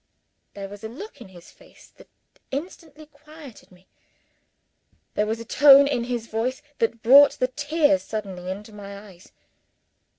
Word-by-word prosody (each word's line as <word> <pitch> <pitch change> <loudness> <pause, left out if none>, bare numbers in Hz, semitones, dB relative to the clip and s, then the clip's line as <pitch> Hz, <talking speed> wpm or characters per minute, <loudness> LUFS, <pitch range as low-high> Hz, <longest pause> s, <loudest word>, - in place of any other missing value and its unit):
There 200 -1 -7
was 205 +2 -12
a 220 - -6
look 305 - -11
in 235 - -11
his 175 -2 -16
face - - -21
that - - -17 0.4
instantly 310 +1 -8
quieted 300 -6 -16
me. 185 +1 -22 1.3
There 210 - -1
was 220 +1 -3
a 230 - -9
tone 280 +3 +7
in 245 -4 -1
his 240 -2 -4
voice 250 +6 -3 0.2
that 230 0 -1
brought 280 +4 +7
the 255 - -2
tears 290 +1 +1
suddenly 190 -4 -7
into 210 +3 -8
my 200 -1 -10
eyes. 195 -3 -16
235 Hz, 155 wpm, -23 LUFS, 205-285 Hz, 1.3 s, tone